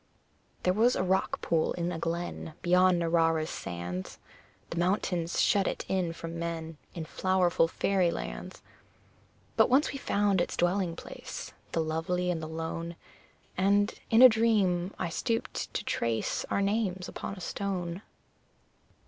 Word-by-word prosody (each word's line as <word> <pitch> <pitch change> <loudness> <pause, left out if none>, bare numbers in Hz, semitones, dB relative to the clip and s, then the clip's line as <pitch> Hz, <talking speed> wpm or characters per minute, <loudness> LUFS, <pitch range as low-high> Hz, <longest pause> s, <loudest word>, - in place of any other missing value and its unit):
There 180 - +3
was 230 +5 +4
a - - 0
rock 190 +1 0
pool 160 -1 +1
in 175 0 -2
a 165 - -4
glen 165 -1 -4
Beyond 180 +1 +5
Narrara's 165 -1 +2
sands; 90 +1 -5 0.5
The 170 - -2
mountains 175 -2 0
shut 200 -2 +3
it - - -3
in 185 -3 0
from 165 0 -6
men 165 -1 -4 0.2
In 165 -2 -4
flowerful 180 -1 +2
fairy 185 +1 +1
lands; - - -6 0.9
But - - +5
once 270 +4 +4
we 275 - -5
found 200 -5 +2
its - - -2
dwelling 175 -1 +1
place - - -8 0.2
The 165 - +1
lovely 175 +3 -1
and 165 -2 -2
the 155 - -5
lone 165 +1 -4 0.6
And, 200 +2 +3 0.2
in 225 +3 +7
a - - +14
dream, 205 -6 +2
I - - -2
stooped 225 +7 -2
to - - -1
trace 115 -1 -1
Our 200 - +1
names 195 -3 0
upon 195 - -5
a - - -10
stone. 180 -1 -3
175 Hz, 150 wpm, -29 LUFS, 165-195 Hz, 0.9 s, a